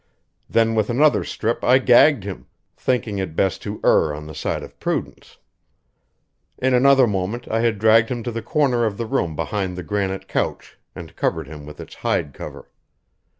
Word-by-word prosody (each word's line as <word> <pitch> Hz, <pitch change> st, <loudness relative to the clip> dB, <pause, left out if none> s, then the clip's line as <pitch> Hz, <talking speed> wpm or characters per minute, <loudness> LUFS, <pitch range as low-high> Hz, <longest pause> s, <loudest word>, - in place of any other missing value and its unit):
Then 115 Hz, 0 st, +2 dB
with 110 Hz, -2 st, 0 dB
another 145 Hz, +5 st, +3 dB
strip 115 Hz, +2 st, -3 dB
I 125 Hz, +1 st, +5 dB
gagged 130 Hz, -1 st, +5 dB
him, 100 Hz, -1 st, -7 dB, 0.3 s
thinking 115 Hz, -5 st, -1 dB
it 90 Hz, -5 st, -4 dB
best 95 Hz, +1 st, 0 dB
to 105 Hz, 0 st, -6 dB
err 75 Hz, -1 st, +3 dB
on 75 Hz, 0 st, -8 dB
the 80 Hz, -, -9 dB
side 70 Hz, -, -3 dB
of -, -, -13 dB
prudence. -, -, -4 dB, 1.2 s
In 130 Hz, 0 st, +1 dB
another 135 Hz, +1 st, +5 dB
moment 105 Hz, +3 st, -3 dB
I 115 Hz, -, 0 dB
had 115 Hz, -2 st, +1 dB
dragged 110 Hz, +2 st, +4 dB
him 120 Hz, -2 st, -3 dB
to 120 Hz, -, -3 dB
the 115 Hz, 0 st, -4 dB
corner 125 Hz, -1 st, +1 dB
of 105 Hz, -3 st, -2 dB
the 115 Hz, -, -3 dB
room 85 Hz, -7 st, -1 dB
behind 95 Hz, +1 st, -3 dB
the 90 Hz, -, -5 dB
granite 95 Hz, +1 st, -3 dB
couch -, -, -3 dB, 0.2 s
and -, -, -10 dB
covered -, -, -1 dB
him 75 Hz, 0 st, -10 dB
with 75 Hz, 0 st, -11 dB
its -, -, -10 dB
hide 70 Hz, -, -2 dB
cover. -, -, -10 dB
110 Hz, 185 wpm, -21 LUFS, 95-120 Hz, 1.2 s, I